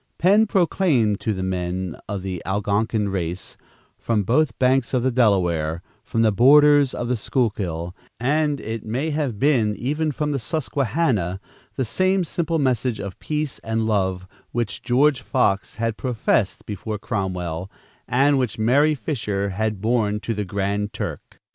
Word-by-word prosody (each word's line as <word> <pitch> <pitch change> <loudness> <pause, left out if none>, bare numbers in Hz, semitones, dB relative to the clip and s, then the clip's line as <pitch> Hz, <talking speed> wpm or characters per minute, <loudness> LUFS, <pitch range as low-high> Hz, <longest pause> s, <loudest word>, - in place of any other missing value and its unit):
Penn 205 +5 +4
proclaimed 160 - +2
to 110 - -1
the 95 -2 -3
men 90 -1 -2
of 100 -3 -3
the 95 -3 -4
Algonkin 105 +2 0
race, 90 -1 -3 0.4
from 110 -3 0
both 125 +3 +1
banks 130 0 +2
of 125 - +1
the 130 - +2
Delaware, 90 -9 +1 0.2
from 115 - 0
the 110 - +4
borders 145 +4 +6
of 120 - -3
the 125 - +1
Schuylkill, 95 -8 -2 0.2
and, 145 +3 +1
it 110 0 -5
may 130 +9 -2
have 145 -7 -2
been, 115 -5 +2
even 150 +6 -1
from 150 +1 -2
the 140 - -1
Susquehannah, 130 - -1 0.4
the 130 - -1
same 185 - +1
simple 165 0 -1
message 125 -5 0
of 100 -2 -6
peace 150 -2 -3
and 110 0 -1
love 95 -4 0 0.2
which 115 -4 -2
George 135 +2 +3
Fox 100 -8 0
had 115 -1 -2
professed 125 -5 0
before 105 +1 -4
Cromwell, 95 -5 -3 0.4
and 135 +3 +3
which 125 -4 -1
Mary 140 +8 +3
Fisher 105 -9 -2
had 105 +1 -2
borne 110 -2 +1
to 115 - -2
the 105 -1 -3
Grand 100 +2 -2
Turk. 115 - -6
115 Hz, 155 wpm, -22 LUFS, 100-140 Hz, 0.4 s, borders